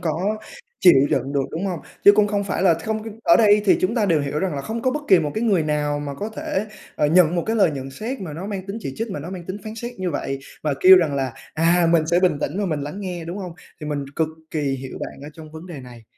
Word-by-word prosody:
có 180 +7 -1 0.4
chịu 180 - +7
đựng 135 -1 0
được, 140 -1 +1
đúng 175 +5 -3
không? 180 -5 -3 0.2
Chứ 205 - +10
cũng 210 0 +4
không 205 -1 -1
phải 185 -1 -2
là 175 -4 +5
không 215 +6 -3 0.2
ở 335 - +6
đây 210 -2 +5
thì 195 - +5
chúng 185 +5 +1
ta 220 -4 +1
đều 160 -4 +3
hiểu 145 +1 -2
rằng 185 -4 -1
là 140 - -3
không 230 +1 -4
có 255 - +2
bất 295 +2 -3
kỳ 185 - +7
một 150 -2 -1
cái 220 - -1
người 195 -8 +3
nào 150 -1 -1
mà 145 -1 -5
có 210 +9 -4
thể, 215 -1 -3 0.3
ờ, 150 - +2
nhận 175 +1 +4
một 170 - +1
cái 225 +1 0
lời 190 -6 +4
nhận 135 -1 -6
xét 225 - -5
mà 165 -6 -6
nó 175 +6 -6
mang 195 -2 -5
tính 200 +2 -5
chỉ 135 - -5
trích, 225 -1 -3
mà 150 - -4
nó 170 +5 -7
mang 180 -2 -7
tính 190 +2 -4
phán 215 0 -6
xét 240 +2 -6
như 185 -2 -2
vậy, 135 -2 -3 0.2
và 150 -3 0
kêu 185 0 +9
rằng 160 -6 +2
là 135 -3 -1 0.2
"À, 170 +2 +3
mình 160 -2 +3
sẽ 175 +2 +2
bình 180 -6 +2
tĩnh 170 +8 -2
và 205 - 0
mình 155 -5 -2
lắng 150 +8 -6
nghe", 180 -4 -5
đúng 175 +4 -6
không? 180 -3 -6 0.3
Thì 150 - -6
mình 145 -2 -2
cực 160 -1 +1 0.2
kỳ 155 - -2
hiểu 135 -2 -3
bạn - - -7
ở 145 - -8
trong 155 -1 -12
vấn 160 +2 -9
đề 160 -7 -8
này. 120 -3 -13
175 Hz, 295 wpm, -22 LUFS, 150-200 Hz, 0.4 s, Chứ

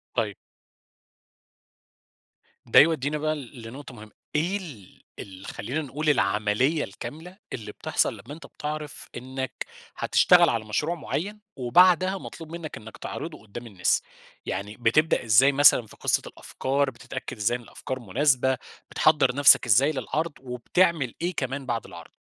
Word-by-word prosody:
طيب. 110 -4 -1 2.3
ده - - +6
يودينا 150 -2 +3
بقى 155 +1 -1
لنقطة 130 -1 -10
مهمة، 110 -2 -12 0.2
إيه 175 +6 +1
ال 140 - -12 0.2
ال 95 -1 -10
خلينا 125 +10 -4
نقول 150 +2 -2
العملية 110 +5 +2
الكاملة 155 - -9 0.2
اللي 105 -3 -6
بتحصل - - 0
لما 140 - -10
أنت 165 - -11
بتعرف 150 -1 -6
إنك 130 +1 -5 0.3
هتشتغل - - +5
على 115 -2 -1
مشروع 150 +11 -1
معيّن، 190 +6 -4 0.2
وبعدها 180 +9 +4
مطلوب 165 -4 -10
منك 165 -2 -7
إنك 110 +1 -11
تعرضُه 160 -1 -7
قُدّام 115 +3 -9
الناس؟ 95 -5 +1 0.4
يعني 100 +5 -4
بتبدأ 125 +8 +2
إزاي 115 +6 +6
مثلًا 140 -4 +6
في - - -15
قصّة - - +1
الأفكار، 140 +1 -2
بتتأكد 120 - -8
إزاي 115 +4 +1
ان - - -15
الأفكار 130 +2 -6
مناسبة، 130 +4 +2 0.3
بتحضّر 145 -5 +3
نفسك 140 -2 +7
إزاي 125 +6 +4
للعرض، 155 +4 -2
وبتعمل 135 +3 0
إيه 175 +2 -1
كمان 135 0 -3
بعد 120 -3 -2
العرض؟ - - -11
135 Hz, 140 wpm, -26 LUFS, 115-155 Hz, 2.3 s, نفسك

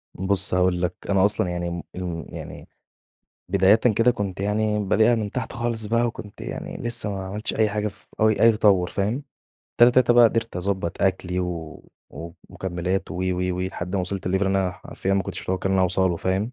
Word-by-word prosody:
بُص 95 0 +3
هأقول 90 -1 +2
لك، 90 0 0 0.2
أنا 95 0 +4
أصلًا 100 -3 +2
يعني، 85 0 -3
إمم، 85 0 -5
امم، 85 -4 -5
يعني - - -9 0.8
بدايةً 95 +2 +5
كده 115 +1 +3
كنت 100 -5 -4
يعني 105 +1 0
بادئها 110 +4 +3
من 105 -3 -2
تحت 125 - -4
خالص 115 -2 -2
بقى 115 +2 +2
وكنت 105 -3 -8
يعني - - -6
لسه 120 -3 -2
ما 95 -1 -4
عملتش 105 +4 -4
أي 110 -1 +2
حاجة 105 0 -2
ف - - -14
أو 110 - +5
أي 115 +2 +5
تطور 100 -5 +3
فاهم، 110 +8 -1 0.6
تاتا 120 +1 +8
تاتا 125 -1 +4
بقى 120 0 +7
قدرت 115 -3 +1
أضبط 95 -2 -2
أكلي 90 -1 0
و 85 -3 -5 0.3
و 85 +1 -8 0.2
ومكملات 90 +1 -3
وِ، - - -5
وِ، 90 0 -1
وِ، - - -3
لحد 95 0 -4
ما - - +1
وصلت 95 0 -3
لLevel 95 +2 +1
أنا 95 -1 +1
حرفيًا 95 +1 -4
ما 100 - +1
كُنتش - - -5
مُتوقع 95 +1 -2
إن - - +1
أنا 95 - +3
هاوصلُه، 90 -1 +1
فاهم 95 +8 -1
95 Hz, 200 wpm, -23 LUFS, 90-110 Hz, 0.8 s, تاتا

